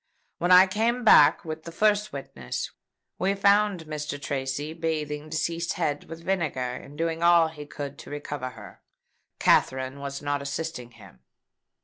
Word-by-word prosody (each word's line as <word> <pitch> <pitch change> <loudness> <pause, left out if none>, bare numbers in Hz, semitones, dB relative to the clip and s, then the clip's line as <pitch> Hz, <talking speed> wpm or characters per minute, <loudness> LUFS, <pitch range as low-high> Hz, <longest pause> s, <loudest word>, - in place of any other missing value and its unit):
When 175 +1 +1
I 180 +1 +9
came 225 +6 0
back 150 -10 +6
with 160 0 -5
the 170 - -9
first 210 +3 +2
witness, 65 - -5 0.5
we 195 +2 +1
found 200 -3 +3
Mr. 150 -2 -5
Tracy 140 +2 -3
bathing 155 -2 -3
deceased's 165 +2 -1
head 145 -1 -2
with 165 +1 -10
vinegar, 170 -9 -1
and 140 +3 -10
doing 165 0 -1
all 170 -1 +5
he 150 -2 -10
could 145 -1 -7
to - - -11
recover 145 -2 -5
her. 110 -4 -13 0.6
Katherine 130 +1 +2
was 140 0 -5
not 145 -1 -2
assisting 140 -3 -4
him." 115 - -16
155 Hz, 150 wpm, -26 LUFS, 140-170 Hz, 0.6 s, I